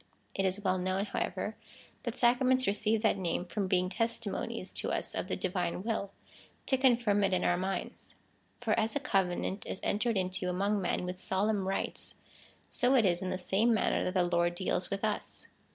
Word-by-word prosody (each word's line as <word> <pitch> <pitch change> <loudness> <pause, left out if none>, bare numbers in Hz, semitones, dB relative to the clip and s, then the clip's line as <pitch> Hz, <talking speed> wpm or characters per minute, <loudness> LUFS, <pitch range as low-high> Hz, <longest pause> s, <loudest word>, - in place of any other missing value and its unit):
It 195 - 0
is 190 +2 -1
well 185 -1 +2
kno^vn, 185 +2 0
however, - - -3 0.5
that 235 +1 -4
sacraments 255 +1 +4
receive 210 +2 +2
that 215 -3 +3
name, 175 -1 -1
from 195 +1 -2
being 185 -1 +2
testimonies 225 +2 -2
to - - -2
us - - -2
of - - -3
the - - -1
divine 180 0 -2
will, 215 -3 -1 0.6
to 265 - +3
confirm^ 240 -6 +3
it 195 -1 +2
in - - 0
our 175 - +3
minds. 190 +2 -4 0.4
For 225 -3 0
as 225 +3 0
a - - +2
covenant 195 -5 0
is - - -4
entered 220 +1 +1
into 185 0 -1
among 200 +3 +1
men 180 0 -1
with 180 0 -5
solemn 195 +1 0
rites, 195 - -3 0.6
so 255 +1 +3
it 235 -5 +5
is 175 -2 +2
in 185 - -2
the 185 - -1
same 210 +5 +2
manner - - +1
that 185 - -2
the 185 - +4
Lord 175 0 +1
deals 180 0 -1
with 195 +1 -3
us. 210 -1 -3
195 Hz, 190 wpm, -31 LUFS, 185-220 Hz, 0.6 s, it